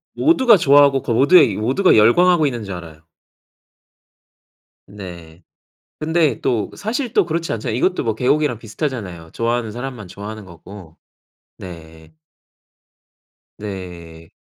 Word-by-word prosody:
모두가 260 -9 +4
좋아하고 140 -3 +4
그 - - -3
모두의 135 - +5
모두가 130 - +2
열광하고 160 +10 +4
있는 120 -5 -4
줄 100 -2 -6
알아요. 80 -3 -11 1.8
네. 90 -4 -11 0.6
근데 160 -1 0
또 115 -5 -1
사실 240 +3 -4
또 205 -6 +3
그렇지 165 0 -3
않잖아요. 110 0 -3
이것도 180 +7 0
뭐 115 -2 -1
개고기랑 135 +2 0
비슷하잖아요. 105 - -6
좋아하는 115 -1 -2
사람만 120 -3 -7
좋아하는 105 +3 -9
거고. 85 -1 -14 0.6
네. 80 -3 -12 1.4
네. 85 -5 -9
115 Hz, 280 characters per minute, -19 LUFS, 90-150 Hz, 1.8 s, 모두의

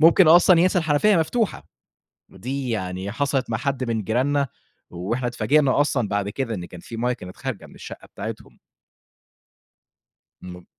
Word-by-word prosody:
ممكن 165 +1 +6
أصلًا 175 +1 +7
ينسى 180 0 +3
الحنفية 165 +6 +3
مفتوحة، 210 +7 -1 0.6
ودي 130 +6 -4
يعني 95 -2 -3
حصلت 135 -1 -1
مع 110 - -1
حد 135 -2 -2
من 115 -2 -1
جيراننا 135 +5 +1 0.4
وإحنا 105 +9 -3
اتفاجئنا 140 +3 +2
أصلًا 125 -7 +1
بعد 100 -1 -1
كده، 115 +1 -3
إن 90 - -5
كان 90 - -11
في 115 - -9
مَيّة 125 +2 0
كانت 90 -6 -9
خارجة 130 -6 -5
من - - -17
الشقة - - -10
بتاعتهم. - - -8 1.8
م 90 -1 -10
130 Hz, 150 wpm, -23 LUFS, 105-145 Hz, 1.8 s, أصلًا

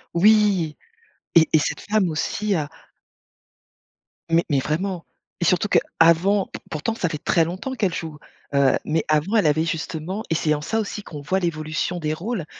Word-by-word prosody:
Oui! 200 -4 +4 0.6
Et 160 -1 +6
et 160 - +6
cette 150 - -2
femme 210 -3 +1
aussi 210 +6 -1
a 150 -4 -2 1.6
Mais 165 +1 +3
mais 140 - +2
vraiment 170 +5 -2 0.4
et - - +2
surtout 180 +3 +2
qu'avant, 185 +2 +3 0.2
pourtant 165 +9 -2
ça 180 -6 -1
fait 155 - -3
très 165 - +3
longtemps 185 +11 -4
qu'elle 200 -7 0
joue, 160 -3 -5 0.4
heu, 140 -2 +4
mais 160 +1 0
avant 155 +8 +1
elle 210 - +4
avait 155 +2 +2
justement 165 +5 -4
et 165 - +1
c'est 155 -1 +1
en 150 - -2
ça 220 +9 -1
aussi 210 -1 -4
qu'on 150 - -8
voit 185 +7 0
l'évolution 160 +1 -2
des 155 -1 -1
rôles, 190 +1 -4
170 Hz, 170 wpm, -23 LUFS, 155-200 Hz, 1.6 s, Et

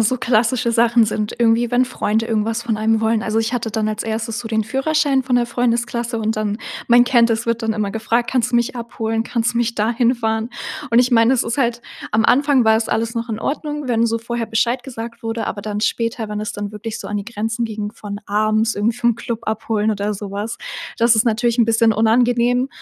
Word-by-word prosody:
so 220 +4 +2
klassische 240 +1 +1
Sachen 235 0 +4
sind 215 0 -2
irgendwie, 235 0 +2
wenn 245 +1 +4
Freunde 225 -3 -1
irgendwas 225 +1 -1
von 230 -2 -1
einem 220 +1 +1
wollen. 220 0 +1
Also, 220 -1 0
ich 225 +1 -1
hatte 235 -2 -2
dann 215 0 0
als 215 0 -3
1. 225 0 -3
so 240 - -6
den 220 -1 0
Führerschein 270 +4 +1
von 255 -1 0
der 240 -1 +2
Freundesklasse. 235 0 -1
Und 220 0 -1
dann, 215 0 -2 0.3
man 240 0 +6
kennt 240 -2 +4
es, 225 0 0
wird 230 0 -1
dann 225 0 0
immer 210 -2 -2
gefragt: 230 +3 -1
„Kannst 250 -1 0
du 240 - +4
mich 240 +2 0
abholen? 225 -1 -3
Kannst 235 +1 -1
du - - +1
mich 235 -1 0
da 215 +1 +1
hinfahren?“ 230 -2 0 0.4
Und 230 +1 +6
ich 250 +1 +2
meine, 230 0 +5
es 250 - +1
ist 235 +4 -3
halt 240 -2 0 0.3
am 220 +1 +2
Anfang 275 -1 +4
war 220 0 +5
es 225 - -2
alles 230 +1 -1
noch 230 0 -3
in 220 -1 -4
Ordnung, 295 -1 -3
wenn 235 -1 +2
so 230 0 0
vorher 235 0 -4
Bescheid 235 +3 0
gesagt 230 -3 -8
wurde. 225 0 -2
Aber 205 - -4
dann 210 0 -3
später, 230 0 -1
wenn 210 0 -4
es 215 - -4
dann 205 0 -5
wirklich 215 +1 -6
so - - -7
an 210 - -2
die 200 - -3
Grenzen 225 +1 -3
ging 210 -2 -4
von 205 -2 -7
abends 215 +2 +1
irgendwie 220 +3 0
vom 235 -1 +2
Club 235 -1 -4
abholen 220 0 0
oder 210 0 -1
sowas. 205 +3 -5 0.4
Das 235 0 +4
ist 220 - +3
natürlich 235 +1 +1
'n 235 - +6
bisschen 225 0 +3
unangenehm. 240 +3 +2
230 Hz, 230 wpm, -19 LUFS, 220-240 Hz, 0.4 s, man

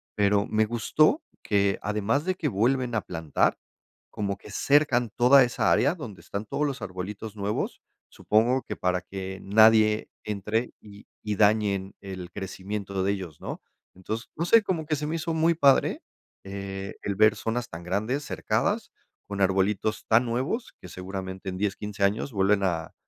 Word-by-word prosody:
pero 100 0 +3
me 110 0 +2
gustó 155 - +2 0.2
que, 100 -1 +1
además 105 - 0
de 185 0 0
que 150 -5 -1
vuelven 125 +4 +1
a 110 - +1
plantar, 80 -5 0 0.5
como 100 -1 -3
que 105 - -13
cercan 130 -1 +3
toda 130 +2 +7
esa 120 - +1
área 140 +6 +3
donde 120 - -9
están 100 +2 -5
todos 150 +8 -1
los 140 -1 -5
arbolitos 100 +3 -6
nuevos, 100 +1 -2 0.3
supongo 120 +5 +1
que - - -5
para 90 0 0
que 95 +1 -7
nadie 110 +1 +5 0.2
entre 105 +3 -2
y 105 0 -14 0.2
y 105 -1 -2
dañen 100 -2 +2
el 95 -2 -7
crecimiento 95 +1 -4
de 100 - +2
ellos, 90 -6 -7
¿no? - - -6 0.3
Entonces, 110 +6 -5
no 165 - -1
sé, 230 +5 +6
como 170 -6 -2
que 155 - 0
se 150 - -3
me 160 - -2
hizo 165 0 -2
muy 160 +1 +3
padre, 140 -4 +3 0.4
eh, 95 0 -6
el 100 - -2
ver 110 +1 +5
zonas 120 +2 -2
tan 85 -3 -8
grandes, 110 +11 -1
cercadas, - - -1 0.4
con 100 -1 -4
arbolitos 95 +2 +1
tan 115 +3 +4
nuevos 130 - -2
que - - -10
seguramente 95 +1 -6
en 90 - -5
10, 100 0 0
15 105 -1 -4
años 105 +7 +1
vuelven 100 0 +2
a 85 -4 -1
105 Hz, 170 wpm, -26 LUFS, 95-125 Hz, 0.5 s, toda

